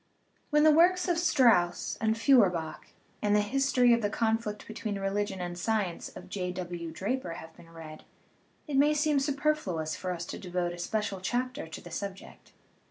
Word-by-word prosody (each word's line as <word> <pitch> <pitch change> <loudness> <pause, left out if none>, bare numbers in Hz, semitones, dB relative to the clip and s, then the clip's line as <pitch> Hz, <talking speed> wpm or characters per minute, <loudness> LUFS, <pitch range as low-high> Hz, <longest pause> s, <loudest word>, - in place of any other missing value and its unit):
When 300 -1 +4
the 310 - +7
works 360 +4 +4
of 345 -2 +1
Strauss 240 - +3
and 220 0 +1
Feuerbach 185 - +2 0.3
and 210 0 +2
The 210 - +4
History 250 +2 +3
of 235 - +2
the 205 - 0
Conflict 220 -1 -1
between 215 -2 -4
Religion 195 0 -2
and 175 -1 -4
Science 195 -1 -2
of - - -10
J. 180 -2 -3
W. 175 -2 -5
Draper 195 +2 -3
have 160 -1 -10
been 165 - -16
read, 160 -2 -11 0.6
it 285 -2 -1
may 295 +2 +4
seem 300 -1 +2
superfluous 275 - -1
for 185 - -4
us 175 -1 -4
to - - -7
devote 180 -1 -2
a 175 - -9
special 205 +1 -2
chapter 245 0 -2
to 160 - -9
the 175 - -12
subject. 195 +1 -7
210 Hz, 175 wpm, -29 LUFS, 175-265 Hz, 0.6 s, the